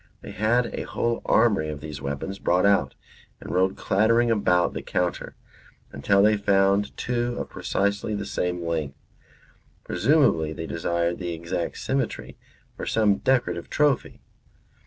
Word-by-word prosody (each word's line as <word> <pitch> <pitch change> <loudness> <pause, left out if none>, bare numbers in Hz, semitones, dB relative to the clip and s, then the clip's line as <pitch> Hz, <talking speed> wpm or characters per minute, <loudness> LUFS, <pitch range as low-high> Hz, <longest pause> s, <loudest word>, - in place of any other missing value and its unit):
They - - -9
had 115 +4 +1
a - - -3
whole 115 0 -2
armoury 105 -9 +3
of 75 -1 -5
these 75 -2 -8
weapons 70 +8 -4
brought 90 +2 +2
out 100 -1 +2 0.4
and - - -8
rolled 95 +1 +2
clattering 115 +4 +2
about 90 -5 +2
the - - -4
counter, 90 -1 -2 0.6
until 100 +8 +2
they 105 0 +4
found 100 0 +2
two 120 -1 -2
of - - -5
precisely 100 +1 -1
the 100 -1 -4
same 90 -3 -2
length. 80 -4 -3 0.9
Presumably 80 -1 +2
they 80 - -6
desired 85 +1 -1
the 90 -2 -3
exact 85 +1 -4
symmetry 135 -3 -3 0.4
for - - -6
some 105 -3 +2
decorative 130 -1 0
trophy. 145 -4 0
100 Hz, 140 wpm, -25 LUFS, 85-110 Hz, 0.9 s, they